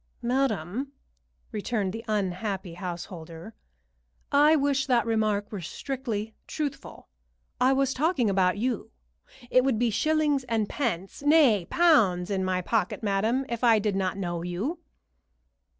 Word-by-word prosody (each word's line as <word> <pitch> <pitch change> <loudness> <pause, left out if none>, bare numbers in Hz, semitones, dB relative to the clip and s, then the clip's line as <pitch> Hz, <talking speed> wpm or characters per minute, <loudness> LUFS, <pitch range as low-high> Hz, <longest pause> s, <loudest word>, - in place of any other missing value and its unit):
"Madam," 245 - -1 0.6
returned 210 -3 -2
the 225 +1 -6
unhappy 195 -2 -2
householder, 175 +1 -7 0.8
"I 295 +2 +6
wish 280 -2 +1
that 245 -3 +3
remark 215 -2 0
were 205 -4 -5
strictly 225 - -4
truthful. 290 -3 -5 0.5
I 260 +2 +4
was 270 -1 +1
talking 295 -4 +1
about 190 -1 +2
you. 235 0 -2 0.6
It 255 - +5
would 265 -4 +1
be 235 0 +1
shillings 295 +3 +1
and 225 -3 0
pence 200 -9 -3
nay, 285 - +4
pounds, 210 - +3
in 190 -1 0
my 185 -1 -1
pocket, 215 0 -1
madam, 220 +6 +1
if 235 0 -4
I 230 -2 +6
did 210 -1 0
not 190 0 -1
know 175 -3 -3
you." 195 - -3
220 Hz, 135 wpm, -27 LUFS, 190-270 Hz, 0.8 s, I